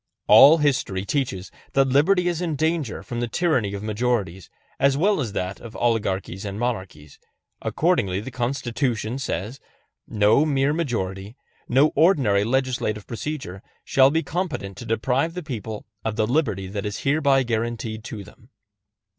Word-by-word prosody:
All 150 +4 +8
history 130 -10 0
teaches 100 -9 -2 0.2
that 135 -1 +3
liberty 175 +7 +3
is 175 -1 -1
in 165 -4 -1
danger 155 -5 -1
from 120 - -5
the 120 - -1
tyranny 120 - 0
of 100 - -6
majorities 105 -5 -2 0.3
as 140 0 +3
well 195 +2 +2
as 125 - -1
from 100 - -9
that 90 +1 -3
of 115 -2 -11
oligarchies 100 -5 -1
and 100 0 -5
monarchies; 95 - -4 0.4
accordingly 125 - +1
the 115 +6 -7
Constitution 120 -1 -2
says: 115 +1 -4 0.5
No 105 +6 +3
mere 140 -1 +1
majority, 105 - -3 0.3
no 135 +5 +4
ordinary 135 - +3
legislative 120 -4 -1
procedure, 120 -6 -5 0.2
shall 135 -1 +5
be 160 +3 0
competent 165 - -3
to 120 - -8
deprive 130 +8 0
the 180 - -5
people 110 -7 -6 0.2
of 110 -1 -2
the 110 - +1
liberty 110 - 0
that 100 +1 -5
is 105 - -5
hereby 140 -2 +3
guaranteed 115 -1 -3
to 105 -3 -6
them. 110 +5 -18
120 Hz, 155 wpm, -23 LUFS, 105-140 Hz, 0.5 s, All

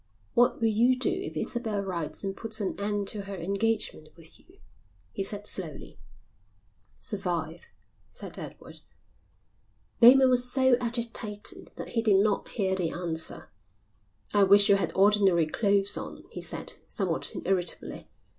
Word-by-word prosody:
"What 240 +1 +3
will 230 - +2
you 240 +4 +3
do 260 +9 0
if 375 +1 -5
Isabel 220 -4 -2
writes 180 -4 -4
and 195 0 -3
puts 225 0 -2
an 200 - -2
end 205 0 -2
to 210 - -3
her 195 0 -6
engagement 195 -2 -2
with 165 -1 -9
you?" 365 +3 -23 0.5
he - - -5
said, 205 +1 -3
slowly. - - -5 1.0
"Survive," 175 -5 -4 0.4
said - - -8
Edward. - - -10 1.2
Bateman 255 +2 +8
was 250 0 +3
so 260 -1 +4
agitated 230 -3 -4
that - - -7
he 230 - 0
did 210 -4 +4
not 205 0 +1
hear 190 -3 -1
the 180 -3 +1
answer. 165 -2 -2 0.8
"I 205 - +4
wish 200 +2 +6
you 200 - +7
had 195 - -1
ordinary 195 -4 +4
clothes 200 +4 +2
on," - - -7
he - - -7
said, - - -3
somewhat - - -2
irritably. 180 -3 -1
205 Hz, 145 wpm, -28 LUFS, 190-230 Hz, 1.2 s, Bateman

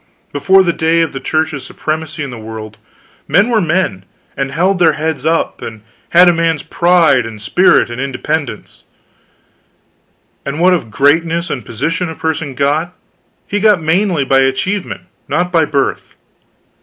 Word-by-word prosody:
Before 190 +6 +4
the 170 -2 +1
day 165 +1 +1
of 165 -3 -1
the 135 - -4
Church's 155 -3 -2
supremacy 155 0 -4
in 140 - -6
the 120 - -8
world, 110 -1 -9 0.5
men 200 +5 +3
were 225 -3 +2
men, 160 - -1 0.3
and 135 0 -2
held 180 +5 +1
their 165 -3 +4
heads 155 -2 -3
up, 165 0 0
and 110 -2 -8 0.3
had 175 +1 +6
a 175 - +5
man's 165 -2 0
pride 170 -7 +3
and 110 -1 -8
spirit 120 - +3
and 120 +2 -5
independence; 140 -2 -4 1.6
and 140 +3 -4
what 180 +2 +4
of 160 -11 -2
greatness 165 - +1
and 125 - -4
position 165 +11 -2
a 160 - -7
person 160 -4 -3
got, 150 +6 0 0.5
he 205 - -2
got 210 -3 +4
mainly 165 -1 +1
by 135 0 +3
achievement, 135 +10 -1 0.3
not 180 0 0
by 165 -3 +3
birth. 140 -2 -2
160 Hz, 155 wpm, -15 LUFS, 135-175 Hz, 1.6 s, had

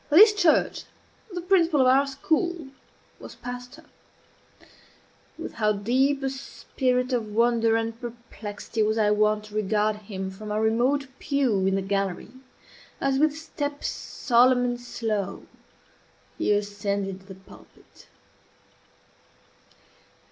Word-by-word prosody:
Of 295 - +4
this 425 +2 +9
church 350 -6 +2 0.5
the 355 -1 -4
principal 340 -5 +3
of - - +4
our 270 +2 +4
school 315 +3 -1 0.5
was - - -11
pastor. 245 +5 -8 1.5
With - - -7
how 215 -1 +1
deep 260 +7 +1
a 270 - +1
spirit 255 -1 -2
of 235 -3 0
wonder 230 +1 +2
and 225 +1 -2
perplexity 230 -2 -6
was 215 +1 +1
I 210 -1 +3
wont 210 0 +2
to 210 - -14
regard 210 0 +1
him 195 -2 -6
from 210 +2 -8
our 210 - 0
remote 240 +6 +2
pew 245 -9 +1
in 195 - +2
the 195 - -1
gallery, 195 0 -2 0.7
as, 270 -1 +1
with 305 0 +2
step 290 -2 -5
solemn 245 0 +2
and 245 0 -2
slow, 215 -5 -3 0.9
he - - 0
ascended 200 -2 -2
the 190 - -10
pulpit! 190 +1 -18
235 Hz, 125 wpm, -25 LUFS, 210-275 Hz, 1.5 s, this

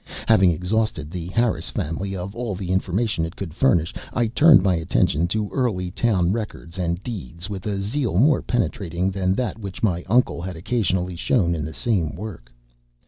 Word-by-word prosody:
Having 100 -5 +6
exhausted 90 -2 -1
the 85 -2 -5
Harris 115 +5 0
family 95 +6 -3
of 95 +2 -5
all 120 -4 -3
the 90 -1 -4
information 95 0 0
it 80 +2 -4
could 90 -6 -6
furnish, 85 - +2 0.2
I 120 - +1
turned 145 - +6
my 95 -2 +3
attention 85 -1 +1
to 105 +2 -2
early 95 -9 -1
town 95 -5 +2
records 100 -5 -5
and 85 +1 -1
deeds 90 - -6
with 95 0 -5
a 100 -2 -1
zeal 110 -1 -1
more 140 +7 +4
penetrating 95 -6 -1
than 95 -1 0
that 120 -1 -2
which 100 -1 -7
my 90 -5 +1
uncle 120 -6 +3
had 90 0 -5
occasionally 90 -1 -1
shown 85 -1 +1
in 80 -3 -2
the 80 - -5
same 90 - 0
work. 90 - -8
95 Hz, 180 wpm, -23 LUFS, 85-110 Hz, 0.2 s, Having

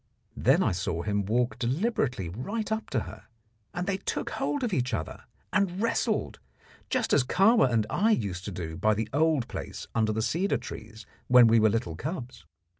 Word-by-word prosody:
Then - - +3
I - - +2
saw 85 -2 -2
him 100 -1 -1
walk 120 +1 0
deliberately 130 - 0
right 200 - -4
up 220 0 -2
to 130 -6 0
her, - - -10 0.5
and 175 0 -3
they 195 0 0
took 195 - -3
hold 285 -2 -2
of 235 -5 -1
each 125 -5 0
other 80 - -6 0.3
and 195 -3 +1
wrestled, 230 +1 0 0.5
just - - 0
as 135 - +5
Kahwa 195 - +4
and 110 -2 +2
I 200 - +1
used 100 - 0
to 105 - -4
do 80 -3 -5
by 110 0 +2
the 110 +1 -2
old 150 -4 +2
place - - -6
under 110 -1 +1
the 110 +1 -1
cedar 185 - +1
trees 110 +1 -9 0.2
when 125 -1 +8
we 115 0 +5
were 110 0 +5
little 100 -7 -2
cubs. 130 - -6
120 Hz, 190 wpm, -28 LUFS, 110-180 Hz, 0.5 s, when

